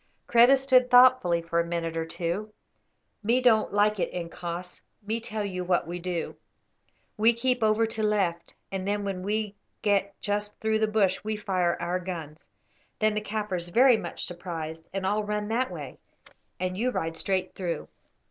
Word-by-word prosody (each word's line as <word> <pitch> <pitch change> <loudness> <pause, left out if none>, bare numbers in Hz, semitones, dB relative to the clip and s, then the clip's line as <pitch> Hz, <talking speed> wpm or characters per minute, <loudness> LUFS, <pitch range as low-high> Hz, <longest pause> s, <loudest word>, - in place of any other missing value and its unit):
Kreta 240 +3 +6
stood 260 -2 +4
thoughtfully 245 -9 +6
for 170 0 0
a - - +3
minute 170 -1 -3
or 165 0 -2
two. 175 +6 -3 0.7
"Me 230 +4 +2
don't 235 -4 +3
like 205 0 +2
it, - - -1
incos. 175 0 -6 0.2
Me 220 +2 -1
tell 220 -2 -4
you 185 -2 -3
what 180 -1 +1
we 175 +2 -5
do. 175 -1 -3 0.8
We 225 +2 +4
keep 250 +1 0
over 220 +1 +3
to 220 0 -4
left, 195 -6 0 0.2
and 190 0 -3
then 205 0 0
when 195 -2 -3
we 210 +1 -2 0.3
get 200 -1 +1
just 205 0 -3
through 220 0 +1
the 220 - +2
bush 205 -3 +1
we 215 0 -2
fire 185 -4 0
our 175 +2 -1
guns. 165 -4 -7 0.5
Then 215 0 +2
the 215 - -1
Kaffirs 205 -5 -3
very 250 +6 +6
much - - -4
surprised 165 -2 -6
and 195 0 -3
all 210 +2 +1
run 210 0 -2
that 250 +3 0
way, - - -8 0.6
and 185 0 -2
you 235 +6 0
ride 165 -9 -2
straight 185 +2 -1
through." 175 -3 -4
200 Hz, 175 wpm, -27 LUFS, 175-220 Hz, 0.8 s, Kreta